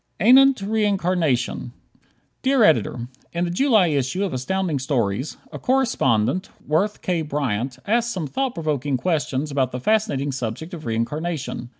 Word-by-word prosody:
Anent 265 Hz, +5 st, +6 dB
Reincarnation. 175 Hz, -, 0 dB, 0.7 s
Dear 265 Hz, -2 st, +3 dB
Editor: 120 Hz, -, +2 dB, 0.3 s
In 170 Hz, +1 st, -1 dB
the 170 Hz, -, -3 dB
July 215 Hz, -3 st, +3 dB
issue 145 Hz, +6 st, 0 dB
of 195 Hz, -, -2 dB
Astounding 160 Hz, +4 st, -1 dB
Stories, 125 Hz, -2 st, -1 dB
a -, -, -7 dB
correspondent, 185 Hz, -, +1 dB, 0.2 s
Worth 195 Hz, +8 st, 0 dB
K. 175 Hz, -3 st, 0 dB
Bryant, 135 Hz, -5 st, -2 dB
asks 235 Hz, +2 st, +1 dB
some 185 Hz, -8 st, -3 dB
thought 265 Hz, -, -2 dB
provoking 145 Hz, -4 st, -1 dB
questions 150 Hz, -2 st, -1 dB
about 135 Hz, -3 st, 0 dB
the 125 Hz, -, -4 dB
fascinating 205 Hz, -, +1 dB
subject 135 Hz, -, -5 dB
of 160 Hz, -6 st, -7 dB
reincarnation. 130 Hz, +3 st, -3 dB
155 Hz, 135 wpm, -22 LUFS, 130-200 Hz, 0.7 s, Anent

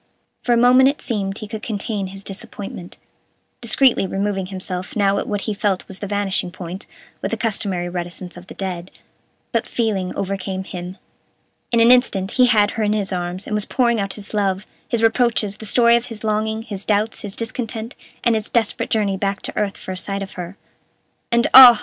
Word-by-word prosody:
For 245 Hz, -, -1 dB
a 240 Hz, -, +5 dB
moment 250 Hz, +2 st, +6 dB
it 285 Hz, -, -3 dB
seemed 200 Hz, -4 st, -2 dB
he 215 Hz, -, -6 dB
could 215 Hz, +1 st, -6 dB
contain 205 Hz, -2 st, -3 dB
his 195 Hz, +1 st, -9 dB
disappointment, 195 Hz, -2 st, -7 dB, 0.6 s
discreetly 235 Hz, -2 st, +3 dB
removing 195 Hz, 0 st, -1 dB
himself 185 Hz, -1 st, -5 dB
now 200 Hz, -2 st, +3 dB
at -, -, -4 dB
what 205 Hz, -1 st, -1 dB
he 215 Hz, -, -2 dB
felt 200 Hz, -2 st, -1 dB
was 190 Hz, -, -8 dB
the 205 Hz, -, -4 dB
vanishing 200 Hz, -2 st, 0 dB
point, 180 Hz, +1 st, -7 dB, 0.3 s
with -, -, -1 dB
the -, -, -2 dB
customary 195 Hz, -6 st, -1 dB
reticence 175 Hz, 0 st, -5 dB
of 175 Hz, +1 st, -12 dB
the -, -, -10 dB
dead, 185 Hz, -2 st, -4 dB, 0.6 s
but -, -, 0 dB
feeling 205 Hz, -6 st, -1 dB
overcame 195 Hz, -1 st, -3 dB
him. 180 Hz, 0 st, -7 dB, 0.7 s
In 235 Hz, -, +3 dB
an 230 Hz, +1 st, +7 dB
instant 205 Hz, -6 st, +3 dB
he 255 Hz, -1 st, +5 dB
had 210 Hz, -3 st, +4 dB
her 225 Hz, -, -2 dB
in 210 Hz, 0 st, +2 dB
his 200 Hz, -2 st, -1 dB
arms, 180 Hz, +2 st, -3 dB
and -, -, -4 dB
was 210 Hz, -1 st, 0 dB
pouring 235 Hz, -3 st, +2 dB
out 195 Hz, -1 st, -2 dB
his 210 Hz, 0 st, -10 dB
love, 195 Hz, -1 st, 0 dB, 0.2 s
his 230 Hz, -1 st, 0 dB
reproaches, 225 Hz, -3 st, +2 dB
the 220 Hz, -, -7 dB
story 235 Hz, +2 st, +5 dB
of 235 Hz, +1 st, 0 dB
his 225 Hz, -2 st, -8 dB
longing, 220 Hz, +1 st, 0 dB
his 205 Hz, -4 st, -6 dB
doubts, 215 Hz, +1 st, 0 dB
his 200 Hz, -2 st, -6 dB
discontent, 230 Hz, 0 st, -4 dB, 0.3 s
and 235 Hz, -, +4 dB
his 220 Hz, -1 st, -1 dB
desperate 230 Hz, -3 st, +1 dB
journey 205 Hz, -3 st, +1 dB
back 195 Hz, +1 st, -2 dB
to -, -, -5 dB
earth 200 Hz, -2 st, -1 dB
for -, -, -7 dB
a 185 Hz, -, -4 dB
sight 195 Hz, +1 st, -2 dB
of 190 Hz, -, -8 dB
her. 180 Hz, +2 st, -7 dB, 0.7 s
"And, 235 Hz, 0 st, +3 dB
ah!" 245 Hz, -4 st, +12 dB
205 Hz, 200 wpm, -21 LUFS, 190-225 Hz, 0.7 s, ah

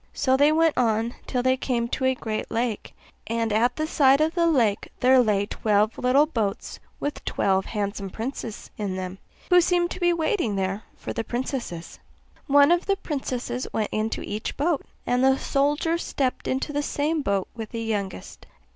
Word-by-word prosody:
So 260 Hz, -1 st, +2 dB
they 290 Hz, +3 st, +5 dB
went 325 Hz, 0 st, +3 dB
on 230 Hz, 0 st, +1 dB
till 250 Hz, -2 st, -1 dB
they 260 Hz, 0 st, +3 dB
came 245 Hz, -3 st, -1 dB
to 260 Hz, -, -1 dB
a 260 Hz, 0 st, +3 dB
great 220 Hz, -3 st, -4 dB
lake; 230 Hz, -2 st, -2 dB, 0.3 s
and 230 Hz, -1 st, -1 dB
at 240 Hz, +3 st, +2 dB
the 310 Hz, -, -1 dB
side 275 Hz, -3 st, +4 dB
of 315 Hz, +1 st, +2 dB
the 340 Hz, -2 st, +2 dB
lake 235 Hz, -10 st, +2 dB
there 255 Hz, +1 st, +5 dB
lay 210 Hz, -4 st, +2 dB
twelve 210 Hz, 0 st, +1 dB
little 260 Hz, +4 st, +4 dB
boats 220 Hz, -9 st, -3 dB, 0.2 s
with 290 Hz, -, -4 dB
twelve 190 Hz, -1 st, +1 dB
handsome 200 Hz, -2 st, -3 dB
princes 225 Hz, +1 st, -6 dB
in 200 Hz, -3 st, -2 dB
them, 185 Hz, 0 st, -5 dB, 0.3 s
who 360 Hz, 0 st, +7 dB
seemed 350 Hz, 0 st, +1 dB
to -, -, -5 dB
be 350 Hz, -1 st, +3 dB
waiting 325 Hz, -, 0 dB
there 195 Hz, +1 st, -1 dB, 0.2 s
for -, -, -6 dB
the 230 Hz, -, -2 dB
princesses. 240 Hz, -, -4 dB, 0.5 s
One 285 Hz, +2 st, +6 dB
of 345 Hz, 0 st, +2 dB
the 395 Hz, -, +3 dB
princesses 255 Hz, -7 st, -4 dB
went 215 Hz, -1 st, 0 dB
into 215 Hz, +1 st, -2 dB
each 215 Hz, +2 st, -4 dB
boat, 300 Hz, 0 st, +1 dB, 0.2 s
and 250 Hz, +1 st, +1 dB
the 265 Hz, 0 st, +5 dB
soldier 295 Hz, +5 st, +1 dB
stepped 265 Hz, -6 st, -2 dB
into 270 Hz, +3 st, -2 dB
the 290 Hz, -, 0 dB
same 300 Hz, +2 st, -1 dB
boat 200 Hz, -6 st, 0 dB
with 225 Hz, -2 st, -6 dB
the 230 Hz, -1 st, -4 dB
youngest. 205 Hz, -4 st, -4 dB
250 Hz, 180 wpm, -25 LUFS, 215-290 Hz, 0.5 s, who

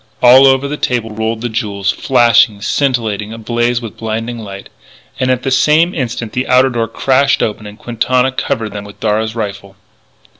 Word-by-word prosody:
All 130 Hz, +2 st, +8 dB
over 135 Hz, +1 st, +2 dB
the 150 Hz, +1 st, -4 dB
table 120 Hz, -5 st, -2 dB
rolled 110 Hz, +1 st, -3 dB
the 120 Hz, -, -2 dB
jewels, 100 Hz, -4 st, -2 dB
flashing, 120 Hz, -5 st, +3 dB
scintillating, 110 Hz, -4 st, -1 dB
ablaze 120 Hz, +2 st, -1 dB
with 115 Hz, -, -8 dB
blinding 115 Hz, +1 st, -4 dB
light. 100 Hz, -2 st, -9 dB, 0.5 s
And 130 Hz, 0 st, 0 dB
at 130 Hz, 0 st, 0 dB
the 135 Hz, -, -2 dB
same 155 Hz, +6 st, +3 dB
instant 120 Hz, -6 st, -4 dB
the 125 Hz, +1 st, -2 dB
outer 130 Hz, +1 st, +4 dB
door 115 Hz, -2 st, -1 dB
crashed 135 Hz, +4 st, +1 dB
open 105 Hz, -1 st, -3 dB
and 105 Hz, 0 st, -11 dB
Quintana 125 Hz, +2 st, 0 dB
covered 115 Hz, -3 st, -2 dB
them 105 Hz, 0 st, -6 dB
with 100 Hz, 0 st, -13 dB
Darragh's 110 Hz, +1 st, -1 dB
rifle. 100 Hz, -3 st, -6 dB
115 Hz, 175 wpm, -14 LUFS, 110-130 Hz, 0.5 s, All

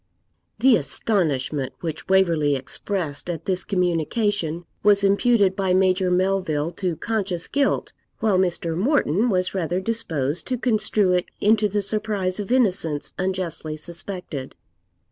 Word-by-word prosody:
The 255 Hz, -3 st, +5 dB
astonishment 145 Hz, -, 0 dB
which 160 Hz, -2 st, -5 dB
Waverley 165 Hz, -7 st, +3 dB
expressed 150 Hz, +3 st, -3 dB
at 165 Hz, -3 st, -4 dB
this 185 Hz, -1 st, 0 dB
communication 175 Hz, -1 st, -1 dB, 0.2 s
was 200 Hz, -1 st, +4 dB
imputed 200 Hz, -1 st, +3 dB
by 190 Hz, -2 st, +1 dB
Major 185 Hz, 0 st, +2 dB
Melville 180 Hz, -4 st, 0 dB
to 175 Hz, 0 st, -2 dB
conscious 195 Hz, -2 st, -2 dB
guilt, 280 Hz, 0 st, 0 dB, 0.2 s
while 210 Hz, -4 st, +2 dB
Mr. 170 Hz, -3 st, -1 dB
Morton 225 Hz, -, +2 dB
was 185 Hz, -3 st, 0 dB
rather 180 Hz, -1 st, -1 dB
disposed 170 Hz, -9 st, -2 dB
to 255 Hz, -, -1 dB
construe 215 Hz, -5 st, +1 dB
it 180 Hz, -1 st, +1 dB
into 215 Hz, 0 st, +3 dB
the 205 Hz, +1 st, 0 dB
surprise 205 Hz, -2 st, -1 dB
of 205 Hz, +3 st, -4 dB
innocence 185 Hz, -, +1 dB
unjustly 180 Hz, -4 st, -3 dB
suspected. 170 Hz, -4 st, -6 dB
185 Hz, 125 wpm, -23 LUFS, 165-205 Hz, 0.2 s, The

